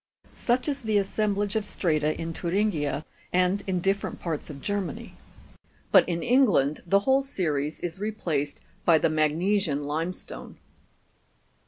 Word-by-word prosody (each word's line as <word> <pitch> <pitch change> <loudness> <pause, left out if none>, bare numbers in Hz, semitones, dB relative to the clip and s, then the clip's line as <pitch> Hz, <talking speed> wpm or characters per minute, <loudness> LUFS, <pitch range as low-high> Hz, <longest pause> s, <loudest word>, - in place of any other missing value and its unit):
Such 250 +3 0
is 280 -1 -1
the 220 -3 +1
assemblage 205 +1 0
of 220 - +1
strata 155 -6 0
in 165 0 -3
Thuringia, 170 -6 0 0.3
and 185 +2 +2
in 185 -2 0
different 195 +2 -1
parts 160 -4 -4
of 140 -2 -8
Germany; 200 -3 -3 0.8
but - - +6
in 170 -1 -1
England 210 - +3
the 200 +3 +4
whole 265 +5 +3
series 155 - -2
is 175 +1 -4
replaced 170 -9 -2 0.2
by 165 -2 +6
the 160 - +2
magnesian 155 +1 +1
limestone. 160 +5 -5
180 Hz, 135 wpm, -27 LUFS, 155-205 Hz, 0.8 s, but